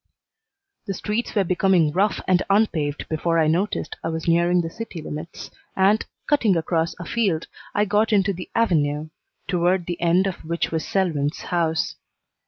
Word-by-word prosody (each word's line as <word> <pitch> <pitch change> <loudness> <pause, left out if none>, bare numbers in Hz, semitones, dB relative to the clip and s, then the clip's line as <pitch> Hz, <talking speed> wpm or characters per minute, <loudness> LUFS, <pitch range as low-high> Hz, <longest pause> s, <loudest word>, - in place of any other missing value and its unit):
The 195 - -2
streets 215 +6 -3
were 200 - +4
becoming 180 -3 +3
rough 195 +5 +1
and 185 -1 +4
unpaved 165 -9 +1
before 165 +1 0
I 160 - +4
noticed 175 +7 -1
I - - -2
was 160 0 -3
nearing 170 +1 +3
the 165 - -4
city 220 -4 -7
limits, 155 +2 -7 0.2
and, 200 +3 +3 0.2
cutting 230 - +3
across 165 0 0
afield, 175 -2 0 0.3
I 205 - +3
got 210 +2 +2
into 200 -1 +3
the 180 0 -8
Avenue, 155 -8 +1 0.4
toward 180 0 +1
the 175 0 -5
end 175 +3 +3
of 190 -3 -4
which 170 +1 -2
was 160 -1 -2
Selwyn's 160 -6 0
house. 165 -2 -1
175 Hz, 160 wpm, -23 LUFS, 160-195 Hz, 0.4 s, were